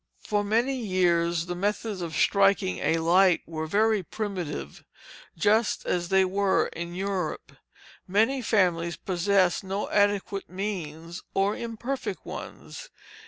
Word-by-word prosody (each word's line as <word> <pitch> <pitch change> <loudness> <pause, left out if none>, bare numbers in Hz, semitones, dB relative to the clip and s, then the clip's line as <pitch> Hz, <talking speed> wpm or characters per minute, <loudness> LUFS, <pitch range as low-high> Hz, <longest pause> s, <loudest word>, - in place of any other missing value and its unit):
For 205 -1 0
many 230 +6 +1
years 175 -6 +1
the 175 - -4
methods 205 +2 -2
of 165 -3 -4
striking 195 +2 +3
a 165 - +1
light 175 +2 +4
were 160 -1 -5
very 215 +4 +2
primitive, 180 - -5 0.5
just 215 +5 +2
as 175 -1 -1
they 190 0 +4
were 195 +1 +1
in 170 +1 -6
Europe; 190 -3 -3 0.6
many 225 +8 +2
families 175 -7 +1
possessed 185 0 +1
no 195 +2 -3
adequate 205 -1 +1
means, 175 -4 -5
or 195 +1 +3
very - - -7
imperfect 235 +4 -4
ones. - - -8
190 Hz, 125 wpm, -27 LUFS, 175-205 Hz, 0.6 s, light